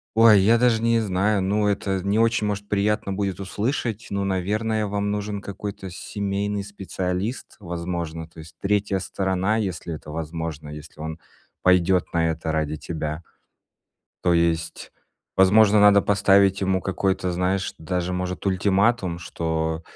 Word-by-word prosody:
ой, 110 Hz, -3 st, +7 dB
я 115 Hz, +4 st, +5 dB
даже 115 Hz, -2 st, +3 dB
не 115 Hz, 0 st, +3 dB
знаю, 100 Hz, 0 st, +1 dB
ну, 105 Hz, +2 st, +1 dB
это 95 Hz, -1 st, -1 dB
не 100 Hz, +3 st, +1 dB
очень, 115 Hz, -1 st, +2 dB
может, 100 Hz, 0 st, -3 dB
приятно 105 Hz, 0 st, 0 dB
будет 100 Hz, -1 st, -2 dB
услышать,- 110 Hz, +3 st, -2 dB
ну, 100 Hz, 0 st, -1 dB
наверное, 105 Hz, +3 st, 0 dB
вам 100 Hz, 0 st, -1 dB
нужен 105 Hz, 0 st, -3 dB
какой-то 100 Hz, 0 st, -6 dB
семейный 100 Hz, +2 st, -3 dB
специалист, 95 Hz, +2 st, -4 dB
возможно. 85 Hz, -2 st, -4 dB
То 85 Hz, -, -15 dB
есть 80 Hz, +1 st, -12 dB
3 100 Hz, -1 st, 0 dB
сторона, 95 Hz, +2 st, -1 dB
если 90 Hz, -6 st, -3 dB
это 75 Hz, 0 st, -10 dB
возможно, 80 Hz, -1 st, -5 dB
если 75 Hz, +1 st, -11 dB
он 80 Hz, +1 st, -5 dB, 0.4 s
пойдет 90 Hz, 0 st, +3 dB
на 80 Hz, -1 st, +2 dB
это 80 Hz, 0 st, -3 dB
ради 75 Hz, -1 st, -1 dB
тебя. 80 Hz, +1 st, -5 dB, 1.0 s
То 90 Hz, -, +4 dB
есть, 85 Hz, -1 st, 0 dB, 0.4 s
возможно, 105 Hz, +2 st, +6 dB
надо 100 Hz, -1 st, +7 dB
поставить 100 Hz, -1 st, +4 dB
ему 95 Hz, -1 st, +1 dB
какой-то, 95 Hz, -1 st, -1 dB
знаешь, 90 Hz, +2 st, -1 dB
даже, 90 Hz, +2 st, -2 dB
может, 90 Hz, 0 st, -3 dB
ультиматум, 95 Hz, -1 st, +1 dB
что 80 Hz, -1 st, -2 dB
95 Hz, 140 wpm, -24 LUFS, 85-105 Hz, 1.0 s, ой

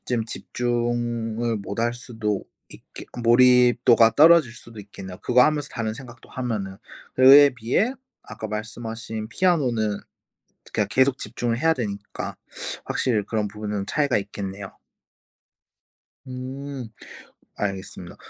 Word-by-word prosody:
좀 120 Hz, -3 st, -1 dB
집중을 120 Hz, -1 st, -2 dB
못할 115 Hz, +4 st, -2 dB
수도 110 Hz, -4 st, -3 dB, 0.2 s
있게 -, -, -12 dB, 0.2 s
몰입도가 120 Hz, -1 st, +5 dB
떨어질 155 Hz, -5 st, +6 dB
수도 115 Hz, 0 st, -13 dB
있겠네요 95 Hz, -2 st, -10 dB
그거 125 Hz, 0 st, +5 dB
하면서 150 Hz, -2 st, 0 dB
다른 110 Hz, -2 st, -3 dB
생각도 125 Hz, -1 st, -12 dB
하면은. 105 Hz, -7 st, -4 dB, 0.4 s
그에 140 Hz, +2 st, +8 dB
비해 125 Hz, -, 0 dB, 0.3 s
아까 110 Hz, -, -8 dB
말씀하신 110 Hz, +1 st, -6 dB
피아노는 120 Hz, -, +1 dB, 0.7 s
그냥 105 Hz, -2 st, 0 dB
계속 130 Hz, +2 st, +3 dB
집중을 115 Hz, +2 st, -3 dB
해야 160 Hz, +4 st, +3 dB
되니까 100 Hz, -4 st, -5 dB, 0.5 s
확실히 110 Hz, -6 st, 0 dB
그런 105 Hz, -2 st, -1 dB
부분은 105 Hz, -1 st, -4 dB
차이가 140 Hz, +1 st, +1 dB
있겠네요. 100 Hz, -1 st, -6 dB, 1.6 s
음. 130 Hz, 0 st, -6 dB, 0.7 s
알겠습니다. 95 Hz, -3 st, -5 dB
115 Hz, 270 characters per minute, -24 LUFS, 105-125 Hz, 1.6 s, 그에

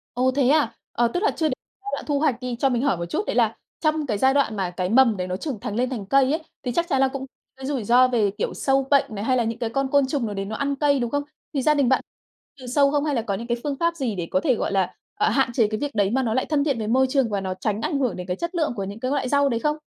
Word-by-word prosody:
Ồ, 255 Hz, +1 st, +2 dB
thế 265 Hz, -1 st, +2 dB
à, 290 Hz, -6 st, +3 dB, 0.2 s
ờ, 240 Hz, 0 st, +2 dB
tức 355 Hz, -, -2 dB
là -, -, +3 dB
chưa 320 Hz, -2 st, 0 dB
đế 265 Hz, -, 0 dB, 0.3 s
giai 275 Hz, -, -6 dB
đoạn -, -, -3 dB
thu 285 Hz, -1 st, +1 dB
hoạch 285 Hz, -6 st, +1 dB
đi. 250 Hz, -1 st, -3 dB
Cho 270 Hz, -, +3 dB
mình 245 Hz, -1 st, 0 dB
hỏi 275 Hz, -11 st, +2 dB
một 170 Hz, -, -3 dB
chút, 290 Hz, -, -2 dB
đấy -, -, -1 dB
là -, -, +2 dB, 0.2 s
trong 310 Hz, -1 st, +1 dB
cái 210 Hz, -3 st, 0 dB
giai 265 Hz, +4 st, +3 dB
đoạn 275 Hz, -6 st, +1 dB
mà 190 Hz, -3 st, -1 dB
cái 180 Hz, +1 st, -3 dB
mầm 230 Hz, -2 st, +4 dB
đấy 180 Hz, -, -3 dB
nó 185 Hz, 0 st, -3 dB
trưởng 260 Hz, -4 st, -4 dB
thành 205 Hz, -, -5 dB
lên 250 Hz, +2 st, +1 dB
thành 225 Hz, -7 st, -4 dB
cây 270 Hz, +4 st, +3 dB
ấy, 315 Hz, +1 st, -1 dB, 0.2 s
thì 250 Hz, -, -2 dB
chắc 340 Hz, +6 st, 0 dB
chắn 270 Hz, -1 st, +2 dB
là 270 Hz, -, +5 dB
cũng 265 Hz, 0 st, -5 dB, 0.3 s
cái 265 Hz, -, -8 dB
rủi 265 Hz, -5 st, -2 dB
ro 250 Hz, +4 st, +5 dB
về, 220 Hz, -5 st, +1 dB
kiểu, -, -, -2 dB
sâu 270 Hz, -1 st, +1 dB
bệnh 280 Hz, -, +5 dB
này, 200 Hz, -, -4 dB
hay 255 Hz, +1 st, +2 dB
là 235 Hz, -, +2 dB
những 230 Hz, +1 st, -3 dB
cái 230 Hz, -2 st, -1 dB
con 275 Hz, +3 st, 0 dB
côn 280 Hz, -2 st, +4 dB
trùng 270 Hz, -3 st, -1 dB
nào 210 Hz, -, -3 dB
đấy 195 Hz, 0 st, -3 dB
nó 220 Hz, +2 st, -5 dB
ăn 280 Hz, +2 st, -1 dB
cây, 285 Hz, -1 st, +2 dB
đúng 240 Hz, -1 st, -1 dB
không? 285 Hz, +2 st, -1 dB, 0.3 s
Thì 275 Hz, -, 0 dB
gia 300 Hz, +3 st, +4 dB
đình 280 Hz, -4 st, +2 dB
bạn 265 Hz, -, +3 dB, 0.6 s
trừ 255 Hz, -, -9 dB
sâu 280 Hz, +2 st, +3 dB
không 290 Hz, 0 st, +1 dB
hay 295 Hz, -, 0 dB
là 230 Hz, -, +1 dB
có 205 Hz, -3 st, -3 dB
những 230 Hz, +4 st, -5 dB
cái 240 Hz, 0 st, 0 dB
phương 290 Hz, -2 st, -1 dB
pháp 335 Hz, 0 st, +1 dB
gì 255 Hz, -9 st, -2 dB
để 175 Hz, -3 st, -4 dB
có 280 Hz, -, +3 dB
thể, 270 Hz, -5 st, +2 dB
gọi -, -, -2 dB
là, 190 Hz, -2 st, 0 dB, 0.2 s
ờ, 420 Hz, +1 st, +2 dB
hạn 270 Hz, -2 st, +2 dB
chế 225 Hz, -3 st, +3 dB
cái 215 Hz, +1 st, -3 dB
việc 290 Hz, -1 st, -2 dB
đấy 200 Hz, -1 st, +2 dB
mà 265 Hz, +1 st, +1 dB
nó 225 Hz, -2 st, 0 dB
lại 260 Hz, -, +1 dB
thân 295 Hz, -2 st, +1 dB
thiện 280 Hz, -4 st, 0 dB
với 215 Hz, -2 st, -3 dB
môi 260 Hz, +3 st, +3 dB
trường 265 Hz, -4 st, +2 dB
và 200 Hz, -2 st, -1 dB
nó 185 Hz, -1 st, -3 dB
tránh 205 Hz, +3 st, -2 dB
ảnh 295 Hz, -1 st, -1 dB
hưởng 255 Hz, -4 st, 0 dB
đến 180 Hz, 0 st, -7 dB
cái 180 Hz, -, -1 dB
chất 340 Hz, -, -4 dB
lượng 310 Hz, -6 st, 0 dB
của 200 Hz, -, -3 dB
những 200 Hz, +3 st, -6 dB
cái 255 Hz, +2 st, -2 dB
loại 270 Hz, -3 st, 0 dB
rau 285 Hz, -1 st, +3 dB
đấy 230 Hz, -2 st, 0 dB
không? 300 Hz, +2 st, 0 dB
260 Hz, 340 wpm, -23 LUFS, 220-280 Hz, 0.6 s, là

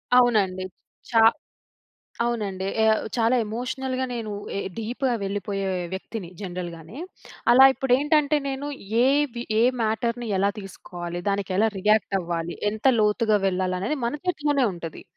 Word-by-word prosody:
అవునండి. 210 Hz, -7 st, +3 dB, 0.5 s
చా 230 Hz, -, +3 dB, 1.0 s
అవునండి. 205 Hz, -5 st, -2 dB, 0.2 s
ఏవ్ 220 Hz, 0 st, +4 dB, 0.2 s
చాలా 235 Hz, +2 st, +3 dB
ఎమోషనల్‌గా 255 Hz, +4 st, -3 dB
నేను 225 Hz, -3 st, -4 dB, 0.3 s
ఏ -, -, -1 dB, 0.2 s
డీప్‌గా 240 Hz, +3 st, -1 dB
వెళ్ళిపోయే 195 Hz, 0 st, -3 dB, 0.3 s
వ్యక్తిని 190 Hz, -1 st, -6 dB
జనరల్‌గానే. 175 Hz, -, -7 dB, 0.5 s
అలా 260 Hz, +2 st, +9 dB
ఇప్పుడేంటంటే 290 Hz, +4 st, +2 dB
నేను 275 Hz, +1 st, -3 dB, 0.4 s
ఏది 270 Hz, -3 st, +1 dB, 0.2 s
ఏ -, -, +4 dB, 0.2 s
మ్యాటర్‌ని 235 Hz, +2 st, -1 dB
ఎలా 200 Hz, +1 st, +2 dB
తీసుకోవాలి? 175 Hz, -3 st, -7 dB
దానికి 200 Hz, -1 st, -1 dB
ఎలా 220 Hz, +2 st, +4 dB
రియాక్ట్ 210 Hz, 0 st, +2 dB
అవ్వాలి? 170 Hz, -1 st, -3 dB, 0.2 s
ఎంత 215 Hz, +4 st, -8 dB
లోతుగా 215 Hz, 0 st, +3 dB
వెళ్ళాలి? 185 Hz, -1 st, 0 dB
అనేది 205 Hz, +11 st, -1 dB
మన 235 Hz, -, -1 dB
చేతిలోనే 295 Hz, -6 st, +1 dB
ఉంటది. 165 Hz, -2 st, -8 dB
220 Hz, 125 wpm, -24 LUFS, 190-250 Hz, 1.0 s, అలా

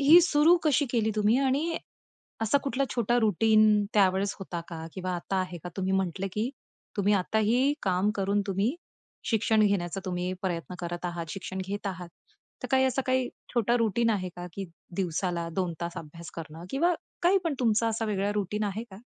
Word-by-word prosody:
ही 310 Hz, +5 st, +9 dB
सुरू 325 Hz, +1 st, +5 dB
कशी 290 Hz, -1 st, +3 dB
केली 220 Hz, -3 st, +1 dB
तुम्ही? 210 Hz, +3 st, +4 dB
आणि 280 Hz, +5 st, +1 dB, 0.7 s
असा 225 Hz, +6 st, +3 dB
कुठला 275 Hz, 0 st, 0 dB
छोटा 240 Hz, 0 st, +2 dB
रुटीन 215 Hz, 0 st, +4 dB
त्यावेळेस 195 Hz, 0 st, +3 dB
होता 180 Hz, -3 st, -5 dB
का? 160 Hz, -1 st, -6 dB
किंवा 185 Hz, -1 st, -3 dB
आता 190 Hz, +3 st, -3 dB
आहे 180 Hz, -2 st, -4 dB
का? -, -, -3 dB
तुम्ही 190 Hz, 0 st, 0 dB
म्हटलं, 190 Hz, 0 st, 0 dB
की 220 Hz, +4 st, -1 dB, 0.5 s
तुम्ही 205 Hz, +1 st, +3 dB
आताही 220 Hz, +8 st, +2 dB
काम 190 Hz, +2 st, +2 dB
करून, 200 Hz, +1 st, +1 dB
तुम्ही 200 Hz, -, 0 dB, 0.6 s
शिक्षण 220 Hz, -1 st, +3 dB
घेण्याचा 195 Hz, -2 st, -1 dB
तुम्ही 180 Hz, 0 st, -2 dB
प्रयत्न 180 Hz, -1 st, -3 dB
करत 175 Hz, +1 st, -5 dB
आहात, 170 Hz, -1 st, -4 dB
शिक्षण 190 Hz, -1 st, -5 dB
घेत 205 Hz, +1 st, -4 dB
आहात. 180 Hz, -3 st, -4 dB, 0.5 s
तर -, -, -4 dB
काही 265 Hz, 0 st, +4 dB
असा 260 Hz, +1 st, +1 dB
काही 255 Hz, -1 st, +2 dB, 0.3 s
छोटा 235 Hz, +1 st, +3 dB
रुटीन 230 Hz, 0 st, +2 dB
आहे 185 Hz, -4 st, -1 dB
का? 175 Hz, 0 st, -6 dB
की 195 Hz, -, -5 dB, 0.3 s
दिवसाला 175 Hz, -2 st, -1 dB
2 180 Hz, -3 st, 0 dB
तास 170 Hz, 0 st, -4 dB
अभ्यास 165 Hz, +1 st, -9 dB
करणं 165 Hz, 0 st, -8 dB
किंवा 340 Hz, +6 st, +2 dB, 0.3 s
काही 375 Hz, +3 st, +5 dB
पण 320 Hz, -4 st, 0 dB
तुमचा 225 Hz, -1 st, +3 dB
असा 225 Hz, 0 st, -1 dB
वेगळा 205 Hz, -1 st, 0 dB
रुटीन 210 Hz, +1 st, -1 dB
आहे 205 Hz, +2 st, -2 dB
का? 190 Hz, -, -10 dB
205 Hz, 180 wpm, -28 LUFS, 185-235 Hz, 0.7 s, ही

